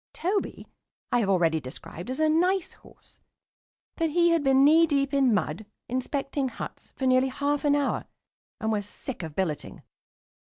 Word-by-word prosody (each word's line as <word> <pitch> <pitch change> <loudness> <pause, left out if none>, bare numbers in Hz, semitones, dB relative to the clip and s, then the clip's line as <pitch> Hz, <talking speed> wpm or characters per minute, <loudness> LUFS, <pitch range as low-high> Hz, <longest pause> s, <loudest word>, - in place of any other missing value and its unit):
Toby 385 +4 -2 0.5
I 245 - +3
have 205 -4 0
already 165 -4 +3
described 155 - -9
as 260 - -4
a 315 - +3
nice 355 +4 +1
horse, - - -19 0.8
but 330 -1 0
he 345 +2 +3
had 335 -1 +3
been 270 0 +5
knee 325 +3 +6
deep 280 -2 0
in 270 -3 +4
mud, 205 -1 -1 0.2
inspecting 270 +2 -2
huts, - - -9
for 265 - -3
nearly 255 0 +4
half 285 +2 -1
an 290 0 +4
hour, 285 -1 0 0.5
and 220 0 -1
was 205 -2 -1
sick 260 0 -6
of 160 -3 -7
billeting. 155 -7 -3
270 Hz, 165 wpm, -27 LUFS, 205-300 Hz, 0.8 s, knee